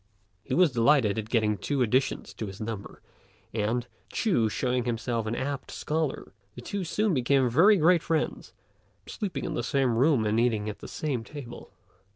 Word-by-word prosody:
He 130 - -2
was 180 -3 +5
delighted 115 -3 +3
at 110 0 -6
getting 110 -3 +1
two 140 -3 0
additions 130 +4 0
to 110 - -5
his 95 0 -9
number 110 -2 -6 0.5
and, 115 +3 0 0.3
Ch'u 120 - +1
showing 125 +2 -1
himself 115 -1 -2
an 110 - -1
apt 140 +1 -4
scholar, 155 -1 -3 0.2
the 120 - -8
two 200 +9 -4
soon 205 +3 0
became 130 0 +3
very 195 - +6
great 170 +1 +4
friends, 165 -2 -2 0.5
sleeping 200 - -4
in 165 - -3
the - - -1
same 135 -4 +1
room 130 -2 +3
and 105 +2 +2
eating 110 -3 +1
at 105 - -7
the - - -9
same 135 -7 -3
table. 120 -2 -10
125 Hz, 175 wpm, -27 LUFS, 115-150 Hz, 0.5 s, very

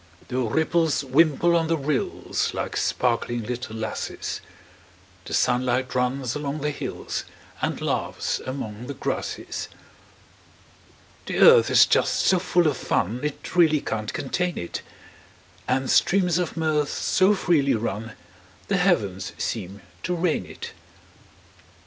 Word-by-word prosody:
The 125 - -1
ripples 160 +5 +1
wimple 155 +5 +3
on 165 -1 +2
the 165 0 +1
rills, 140 -2 -1
Like - - -3
sparkling 120 -1 0
little 120 -1 -5
lasses; 110 -1 -4 0.8
The - - -7
sunlight 125 +1 +1
runs 125 0 0
along 145 0 -3
the 150 +1 0
hills, - - -4 0.4
And - - -1
laughs - - -2
among 125 -3 -6
the 140 - -5
grasses. - - -4 1.6
The - - -2
earth 470 -1 +7
is - - +7
just - - +2
so 185 - +4
full 175 -1 +2
of 145 -4 +2
fun 110 +6 -1
It 150 +3 -5
really 160 -4 +5
can't 110 -5 -3
contain 180 +5 -2
it; 85 - -4 0.9
And 130 +1 +1
streams 180 +1 +3
of 175 -1 -3
mirth 155 -3 +1
so 190 +3 +2
freely 155 -8 +2
run 110 0 -3 0.6
The 195 - +2
heavens 100 - +1
seem 100 -2 -4 0.2
to 180 - -1
rain 170 -1 0
it. - - -8
140 Hz, 130 wpm, -24 LUFS, 120-170 Hz, 1.6 s, earth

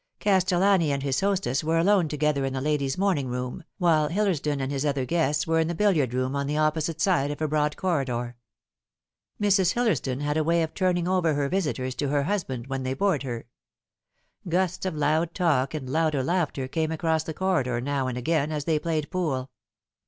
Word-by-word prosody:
Castellani 185 -3 +3
and 140 -1 -2
his 135 -2 0
hostess 195 -9 0
were 160 +1 +1
alone 185 0 +3
together 150 -1 0
in 135 0 -2
the 135 - -2
lady's 140 -1 -1
morning 185 -9 +1
room, 125 0 -4
while 160 -4 +3
Hillersdon 165 -6 0
and 135 0 -2
his 140 -1 -1
other 140 -3 0
guests 150 -2 +1
were 165 0 +1
in 160 - +2
the 170 - -2
billiard 165 - +2
room 130 +2 -1
on 140 0 -1
the 150 +1 -1
opposite 155 +1 0
side 170 -7 +2
of 145 - -5
a 155 - 0
broad 150 0 0
corri 170 -7 0
dor. 120 -1 -4 1.0
Mrs. 195 -3 +3
Hillersdon 205 - 0
had 150 +1 0
a 155 - +2
way 165 +1 +2
of 160 - -4
turning 180 -2 +1
over 180 -4 +2
her 140 -1 0
visitors 145 -8 -1
to 145 - -2
her 145 0 +1
husband 140 - -2
when 135 0 -3
they 130 0 -2
bored 190 -2 +1
her. 120 -4 -5 1.0
Gusts 185 +1 0
of 180 - -3
loud 155 +3 +1
talk 150 -6 +1
and 140 -4 -5
louder 155 -1 +1
laughter 155 -5 -1
came 160 +3 -1
across 160 0 0
the 160 0 -6
corridor 145 -11 0
now 135 +1 -1
and 125 -1 -3
again 150 +3 0
as 150 -2 -3
they 160 -2 +1
played 155 -2 -2
pool. 140 -8 -2
155 Hz, 200 wpm, -26 LUFS, 135-175 Hz, 1.0 s, Castellani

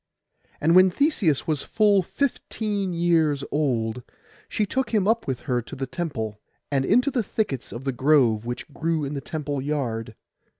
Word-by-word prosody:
And 165 +3 +3
when 185 +1 +8
Theseus 190 - +1
was 155 -3 0
full 210 -3 +3
fifteen 210 -4 -2
years 165 -4 +2
old 125 -6 0 0.5
she 215 - 0
took 260 +3 -1
him 210 -3 +1
up 230 +1 +1
with 130 -3 -2
her 125 -3 0
to 115 - -9
the 135 - -3
temple, 125 -9 -4 0.3
and 135 -1 +1
into 250 - +3
the 245 - +1
thickets 190 - -3
of 120 - -7
the 135 - 0
grove 130 -5 +3
which 120 +1 -5
grew 160 +1 -1
in 140 - -4
the 140 - -3
temple 145 0 -3
yard. 120 -6 -3
150 Hz, 170 wpm, -24 LUFS, 130-195 Hz, 0.5 s, when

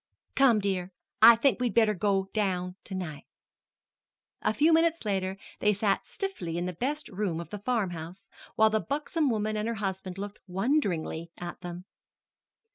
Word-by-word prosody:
"Come, 265 -5 +5
dear; 190 -3 -1 0.3
I 230 +1 +10
think 240 -1 +2
we'd 245 -2 -1
better 220 -2 +5
go 195 0 +1
down 180 -4 0
to 190 - -6
night." 155 -6 -5 1.2
A - - +2
few 305 +8 +4
minutes 330 -3 +3
later 190 -2 -1 0.2
they 210 0 +3
sat 200 0 0
stiffly 280 - -4
in 175 - -1
the 180 - -3
best 285 - -2
room 190 -5 -2
of 170 - -8
the 210 - -5
farmhouse, 185 -7 -3 0.3
while 220 0 +5
the 220 - +2
buxom 295 - -1
woman 215 -2 0
and 215 +1 -1
her 230 - -1
husband 190 -3 -4
looked 205 +1 -6
wonderingly 185 - 0
at 175 0 -7
them. 175 +1 -7
205 Hz, 165 wpm, -29 LUFS, 180-230 Hz, 1.2 s, I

